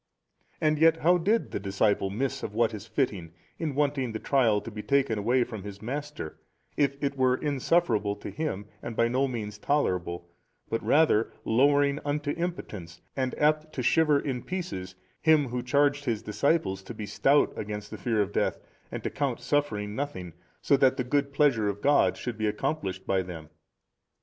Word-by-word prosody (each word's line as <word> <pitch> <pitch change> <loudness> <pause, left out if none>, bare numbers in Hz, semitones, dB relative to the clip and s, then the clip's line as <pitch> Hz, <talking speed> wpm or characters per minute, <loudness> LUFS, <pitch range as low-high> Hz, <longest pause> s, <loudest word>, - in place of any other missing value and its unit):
And 155 -1 +2
yet 165 0 +5
how 175 +3 +4
did 215 +7 +1
the - - -2
disciple 100 0 +1
miss 135 +7 -2
of 105 - -6
what 115 0 +2
is 105 +1 -7
fitting, 105 - -2 0.3
in 155 -5 -2
wanting 140 -4 0
the 110 - -3
trial 115 -6 +3
to 115 - -8
be 105 0 -6
taken 135 -4 +1
away 120 +4 +2
from 110 -4 -7
his 100 0 -8
Master, 145 - -5 0.4
if 140 -1 +1
it 140 0 0
were 130 -1 +3
insufferable 135 -7 +1
to - - -8
Him 150 -11 -3 0.2
and 115 - -6
by 115 - +3
no 130 +3 +1
means 105 -5 -5
tolerable 90 - -1 0.4
but 115 - -2
rather 145 -8 +3
lowering 140 +4 +3
unto 145 0 -1
impotence 105 - -5 0.2
and 130 -1 -2
apt 155 +1 +1
to 125 - -3
shiver 150 +1 +4
in 130 -4 -3
pieces 165 - -5 0.3
Him 155 -4 +4
Who 125 +1 -2
charged 145 +2 +2
His 115 -4 -1
disciples 105 - 0
to 120 - -9
be 105 - -5
stout 135 +8 +3
against 105 0 -5
the 110 - -6
fear 110 +1 +1
of 100 +1 -7
death - - +1 0.3
and - - -5
to - - -2
count 135 -5 -1
suffering 120 -5 -1
nothing, 130 - -4 0.3
so 140 - +4
that 130 -1 +3
the 125 - 0
good 140 +3 0
pleasure 135 -8 +3
of 100 0 -4
God 145 +6 +3
should 120 -3 -5
be 110 - +1
accomplished 100 -4 -2
by 95 -1 +1
them? 85 -4 -9
125 Hz, 185 wpm, -28 LUFS, 105-145 Hz, 0.4 s, yet